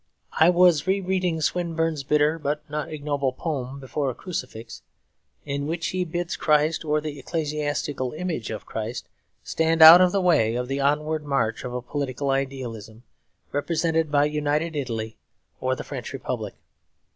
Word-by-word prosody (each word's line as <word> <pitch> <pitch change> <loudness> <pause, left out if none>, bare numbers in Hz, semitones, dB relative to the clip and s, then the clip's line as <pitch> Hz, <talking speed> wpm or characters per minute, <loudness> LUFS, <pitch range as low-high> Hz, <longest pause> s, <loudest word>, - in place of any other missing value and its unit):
I 160 +2 +7
was 180 -2 +4
re 195 +1 +2
reading 180 -3 -1
Swinburne's 165 -2 -1
bitter 150 +3 +2
but 150 0 -3
not 150 +1 -4
ignoble 145 -3 -1
poem, 135 -3 -4
'Before 135 +1 -2
a 125 - -5
Crucifix,' 125 -10 -7 0.6
in 140 0 -3
which 165 +1 -2
he 185 0 -1
bids 175 +1 -3
Christ, 155 +1 +2
or 150 -1 +1
the 150 -2 -6
ecclesiastical 145 -4 -2
image 160 -7 -4
of 110 - -6
Christ, 110 +2 -5 0.4
stand 160 0 +2
out 165 +3 +12
of 180 -1 +5
the 200 - +1
way 150 - +3
of 125 0 -2
the 135 +1 -2
onward 150 +2 0
march 120 -6 -1
of 125 0 -5
a 125 - -4
political 140 0 -2
idealism 125 -5 -4 0.5
represented 160 +2 0
by 145 0 +4
United 150 +2 -1
Italy 115 -5 -4 0.4
or 130 0 0
the - - -6
French 135 -3 -7
Republic. 125 -6 -4
150 Hz, 155 wpm, -24 LUFS, 130-165 Hz, 0.6 s, out